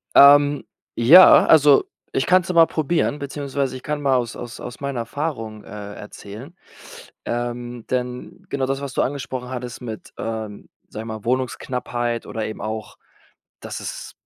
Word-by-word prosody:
Ähm, 145 +1 +7 0.3
ja, 155 +11 +8
also, 150 -3 +6 0.3
ich 135 - +1
kann's 185 -1 +3
ja 180 - -3
mal 165 -1 +8
probieren, 155 -1 -1
beziehungsweise 140 -1 -3
ich 130 - -9
kann 150 -1 -3
mal 135 -2 +2
aus 120 -2 -1
aus 120 - -8
aus 120 - -8
meiner 140 -3 -3
Erfahrung, 115 -4 -5
äh, 105 -1 -8
erzählen. 105 - -10 0.7
Ähm, 120 0 -4
denn 125 0 -4
genau 135 -1 -1
das, 135 +1 -2
was 140 -2 -6
du - - +1
angesprochen 130 -2 -4
hattest 125 -1 -6
mit, 110 -3 -8
ähm, 110 -2 -6 0.2
sage 110 - -7
ich - - -9
mal, 110 0 -7
Wohnungsknappheit 120 -1 -2
oder 110 -2 -4
eben 110 - -7
auch, 110 -1 -5 0.6
dass - - -7
es - - -7
125 Hz, 160 wpm, -22 LUFS, 115-140 Hz, 0.7 s, ja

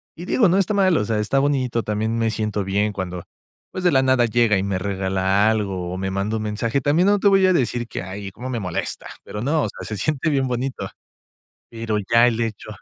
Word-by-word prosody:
Y 175 - -8
digo, 205 0 +3
no 180 - +3
está 195 +1 +1
mal, 190 -4 +3
o 105 - 0
sea, 110 0 -1
está 110 +6 +1
bonito, 130 -4 0
también 110 +2 -1
me 115 -1 +1
siento 105 -2 -2
bien 100 +2 0
cuando, 90 -3 -5 0.5
pues, 185 - -5
de 180 - +5
la 130 - +5
nada 130 -2 +3
llega 115 -2 +2
y 95 - -1
me 100 -1 -1
regala 95 +1 +1
algo 95 -5 -2
o - - -4
me 95 0 -3
manda 100 +3 -1
un 110 - -4
mensaje. 110 +5 -1
También 155 +7 +2
no 205 0 +4
te 200 - +3
voy 195 -1 +4
a 185 - +4
decir 120 -6 0
qué 110 - -5
hay, 100 +1 -7
cómo 125 +6 -7
me 120 -3 -2
molesta, 90 -5 -4 0.2
pero 105 - -6
no, 145 +5 +1
o - - -1
sea, - - -9
se 105 - -4
siente 155 - 0
bien 135 -3 +1
bonito. 125 +2 -3 0.9
Pero 115 -2 -3 0.2
ya 115 +1 +7
el 115 -2 -1
hecho 110 -3 -4
115 Hz, 240 wpm, -22 LUFS, 100-135 Hz, 0.9 s, ya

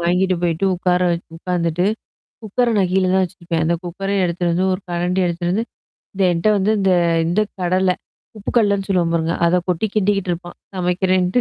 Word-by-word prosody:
வாங்கிட்டு 180 +2 +1
போயிட்டு 170 +2 0
உட்கார 180 0 +1 0.4
உட்காந்துட்டு, 175 0 -1 0.6
குக்கர 235 +3 0
நான் 185 -2 +1
கீழ 190 0 +3
தான் 190 - +4
வச்சுருப்பேன். 170 -2 -3
அந்த 170 +1 +2
குக்கர 195 +3 -4
எடுத்து 175 0 -2
வந்து, 180 +2 +1
ஒரு 185 - -2
கரண்டி 175 +2 0
எடுத்துட்டு 175 0 -2
வந்து, 220 +5 0 0.5
இந்த 195 - +1
என்ட்ட 165 +4 0
வந்து 200 +2 +2
இந்த 195 -1 +2 0.4
இந்த 175 +5 +1 0.2
கடல, 185 +1 +2 0.4
உப்புக்கல்லன்னு 200 -2 +1
சொல்லுவோம் 175 -3 +1
பாருங்க. 165 0 0
அத 170 - +3
கொட்டி 180 +4 +1
கிண்டிகிட்டு 195 -3 +1
இருப்பான் 175 +1 -9 0.2
சமைக்கிறேன்ட்டு. 185 +2 +1
180 Hz, 165 wpm, -20 LUFS, 175-190 Hz, 0.6 s, தான்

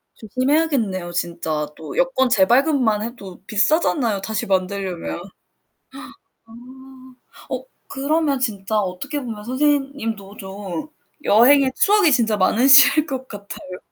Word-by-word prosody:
조심해야겠네요. 255 - -1
진짜 160 -3 -3
또 155 -2 -9
여권 265 -1 +2
재발급만 240 +1 +2
해도 210 -6 -9
비싸잖아요 225 - +1
다시 220 +2 -3
만들려면. 190 -2 -2 1.2
아. 225 - -19 1.0
어 - - -4 0.2
그러면 285 +1 0
진짜 215 -4 -2
어떻게 210 - -3
보면 220 -4 -7
선생님도 260 -6 -2
좀 195 - -7 0.4
여행의 260 +5 +5
추억이 400 -6 +4
진짜 225 -4 +2
많으실 270 +9 +5
것 265 -2 -5
같아요. 200 -3 -9
225 Hz, 265 characters per minute, -20 LUFS, 195-275 Hz, 1.2 s, 여행의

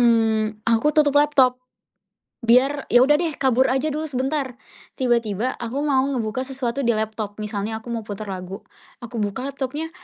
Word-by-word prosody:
mmm, 220 -2 +2
aku 230 +4 +2
tutup 290 -2 +4
laptop 260 -4 +3 0.8
biar 255 +5 +3
ya 245 +1 +6
udah 295 +2 +4
deh 335 -2 0
kabur 260 -1 +2
aja 265 +4 0
dulu 305 +2 -3
sebentar. 270 +1 -1 0.5
Tiba-tiba 235 -2 0
aku 245 +4 -3
mau 270 -3 +2
ngebuka 255 -1 -2
sesuatu 265 -1 -3
di 235 - +3
laptop. 215 -1 -3
Misalnya 215 +1 -4
aku 240 - -9
mau 230 -1 -3
putar 205 0 -6
lagu. 185 +1 -6 0.4
Aku 240 0 -6
buka 210 +4 -2
laptopnya 285 +4 -4
245 Hz, 160 wpm, -22 LUFS, 220-275 Hz, 0.8 s, ya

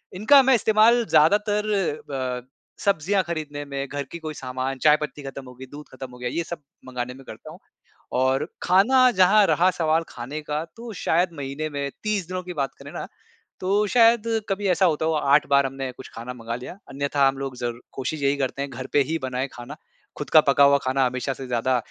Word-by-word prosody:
इनका 245 +9 +6
मैं 265 0 +5
इस्तेमाल 225 +1 +4
ज़्यादातर 205 +6 +3 0.5
ब 130 -2 -4 0.3
सब्ज़ियाँ 195 +1 +1
खरीदने 155 -4 -5
में, 140 -1 -4
घर 145 +1 -4
की 170 - -7
कोई 155 -1 -6
सामान, 130 0 -4
चाय 150 -1 +7
पत्ती 150 -1 -6
ख़त्म 135 0 -7
हो 125 - -11
गई, 130 +2 -10
दूध 150 +1 -10
ख़त्म 130 -1 -8
हो 125 - -13
गया 125 - -3
ये 170 - -2
सब 165 -1 -7 0.3
मँगाने 125 -1 -4
में 135 +1 -14
करता - - -11
हूँ। - - -13 0.6
और 130 +1 +1 0.2
खाना 250 +8 +5
जहाँ 200 +3 +6
रहा 180 +2 +3
सवाल 160 0 +2
खाने 130 +6 -6
का 150 +1 -3
तो 230 0 -8
शायद 175 +3 +2
महीने 140 +2 -4
में 140 -1 -3
30 210 -4 -1
दिनों 185 0 -4
की 180 0 -7
बात 140 -3 -2
करें - - -11
ना - - -5 0.5
तो 200 +3 +1
शायद 230 0 +4 0.3
कभी 200 +1 -2
ऐसा 180 +1 +3
होता 160 -1 0
हो 160 - +1
8 150 -1 +3
बार 140 -1 +4
हमने 135 0 -5
कुछ 130 +1 -12
खाना 120 +2 -7
मँगा 115 -1 -6
लिया। 125 +9 -9
अन्यथा 140 0 +1
हम 135 0 -3
लोग 135 -2 -5
ज़र 120 -1 -4
कोशिश 140 +3 -4
यही 140 +1 +2
करते 140 0 -2
हैं 140 - -5
घर 130 +1 -7
पे 145 - +4
ही 165 - 0
बनाए 130 +1 -2
खाना 120 +5 -9 0.4
ख़ुद 145 - -6
का 155 - +8
पका 140 +1 +5
हुआ 140 0 +5
खाना 130 0 +2
हमेशा 130 +2 -2
से 130 0 -8
ज़्यादा 125 +1 0
145 Hz, 215 wpm, -24 LUFS, 130-180 Hz, 0.6 s, का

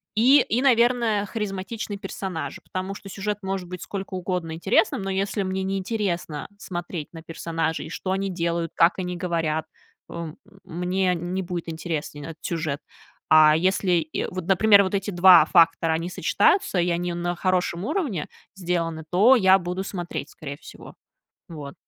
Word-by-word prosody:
и, 260 +6 +6
и, 240 +1 0
наверное, 235 -4 +3
харизматичные 205 0 -4
персонажи, 190 -4 -5
потому 185 +1 -5
что 200 - -11
сюжет 205 +1 -3
может 190 -2 -4
быть 180 -1 -7
сколько 195 -1 -6
угодно 180 -2 -3
интересным, 200 +5 +1
но 195 - -3
если 195 +1 -1
мне 190 0 -2
не 195 +1 -1
интересно 185 -6 -3
смотреть 175 -5 -5
на 165 -1 -10
персонажей, 165 0 -3
и - - -9
что 185 +3 -4
они 195 +1 -1
делают, 170 -2 -2
как 170 +3 +4
они 180 -1 -3
говорят, 165 -3 -1 0.4
о - - -9
м, 155 - -11 0.3
мне 180 +2 0
не 175 +3 -3
будет 175 -1 -5
интересен 160 -3 -5
этот 165 -1 -10
сюжет. 155 -4 -2 0.5
А 155 -1 +7
если, 185 +3 +1
и 160 -2 -1
вот 185 -1 -5
например, 200 +1 +6
вот 190 +1 -3
эти 195 +1 -1
два 175 -3 +7
фактора, 165 0 +4
они 165 +2 -2
сочетаются, 380 - +2
и 175 - 0
они 175 0 -1
на 175 +1 -2
хорошем 185 -1 0
уровне 240 - -2 0.3
сделаны, 170 -4 -2
то 225 +9 +6
я 190 -2 +6
буду 180 +1 -4
смотреть, 175 -3 -5
скорее 140 -3 -8
всего. - - -13 0.5
Вот. 145 -4 -8
180 Hz, 165 wpm, -24 LUFS, 165-195 Hz, 0.5 s, А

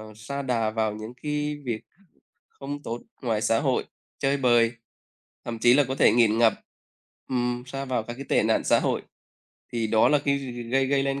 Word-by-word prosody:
sa 140 +7 -5
đà 120 -5 0
vào 110 -1 -1
những 110 +2 -8
cái 150 0 -2
việc 115 -3 -2 0.7
không 145 +1 -7
tốt 115 +1 -5 0.2
ngoài 115 -4 0
xã 115 0 +2
hội, - - 0 0.3
chơi 140 +1 +1
bời, 120 -3 +4 0.7
thậm 115 -1 -5
chí 120 +2 +6
là 145 +2 +5
có 130 - -2
thể - - +5
nghiện 115 -2 +4
ngập. 115 -1 +5 0.8
Ừm, 125 -1 -1
sa 135 +1 -5
vào 125 -4 -1
các 120 - -6
cái 135 +3 -8
tệ - - +3
nạn - - +2
xã - - +4
hội, - - 0 0.7
thì 115 -2 0
đó 110 0 +4
là 150 - +4
cái 140 -1 +2 0.3
gây 135 0 +3
gây 135 0 +2
lên 135 0 -1
125 Hz, 195 wpm, -26 LUFS, 115-135 Hz, 0.8 s, chí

